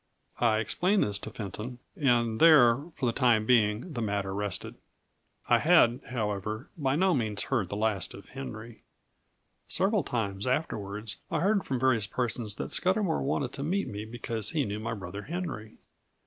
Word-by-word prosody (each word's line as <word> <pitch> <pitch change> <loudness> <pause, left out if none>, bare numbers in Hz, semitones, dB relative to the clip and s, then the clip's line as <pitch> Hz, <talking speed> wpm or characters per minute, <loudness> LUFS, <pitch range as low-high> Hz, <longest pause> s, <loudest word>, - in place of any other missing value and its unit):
I 115 -3 +3
explained 180 - +1
this 100 -1 -2
to - - -7
Fenton; 110 +4 -6 0.2
and 120 - +2
there, 140 -5 +6
for - - -2
the 120 - +2
time 115 -3 +3
being, 115 - +2
the 120 - -3
matter 100 -3 -2
rested. 100 -2 -3 0.7
I - - +5
had, 120 +2 +5
however, 110 0 -3
by 135 -4 0
no 185 +3 +3
means 110 -7 0
heard 110 -9 -1
the 100 - -4
last 105 -3 0
of 100 - -13
Henry. 120 -4 -8 0.9
Several 195 +2 +3
times 100 -3 -2
afterwards 105 -6 -2
I - - -1
heard 200 +2 +2
from 130 -2 -2
various 120 -5 +2
persons 115 -3 -2
that - - -5
Scudamour 185 -2 +2
wanted 135 -2 -1
to 140 - -6
meet 185 +7 -1
me 105 0 -5
because 115 -1 -3
he 150 -4 0
knew 105 0 -4
my 115 +1 -3
brother 100 0 -7
Henry. 145 - -6
115 Hz, 165 wpm, -29 LUFS, 105-140 Hz, 0.9 s, there